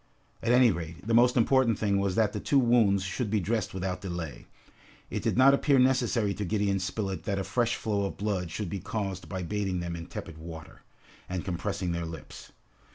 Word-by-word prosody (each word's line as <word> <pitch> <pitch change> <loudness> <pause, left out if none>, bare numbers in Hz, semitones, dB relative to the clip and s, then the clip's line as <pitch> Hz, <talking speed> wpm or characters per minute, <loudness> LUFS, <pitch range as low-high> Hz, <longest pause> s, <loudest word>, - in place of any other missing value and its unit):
At 115 - +1
any 125 -1 +6
rate, 85 0 -6
the 115 - 0
most 120 +2 +5
important 120 -1 +3
thing 100 -2 +1
was 100 -2 0
that 110 -2 +2
the - - -2
two 140 - +1
wounds 115 -6 +4
should 100 +4 -2
be 105 +1 +2
dressed 100 +1 -1
without 95 -1 -3
delay. 85 -5 -6 0.6
It - - -2
did - - 0
not 135 +2 +7
appear 140 0 +3
necessary 125 -5 +2
to 105 - -4
Gideon 100 0 0
Spilett 95 -1 -3
that 100 - -1
a 95 - -1
fresh 120 +5 0
flow 100 -2 -1
of 100 - -5
blood 100 -4 -2
should 105 +5 -4
be 100 - -4
caused 95 -1 -4
by 95 -2 -3
bathing 95 0 -2
them 85 -1 -4
in 85 0 -7
tepid 80 -2 -8
water, 80 -1 -10 0.5
and 90 -1 -3
compressing 95 0 -2
their 85 -1 -2
lips. 80 -3 -10
100 Hz, 205 wpm, -28 LUFS, 90-115 Hz, 0.6 s, not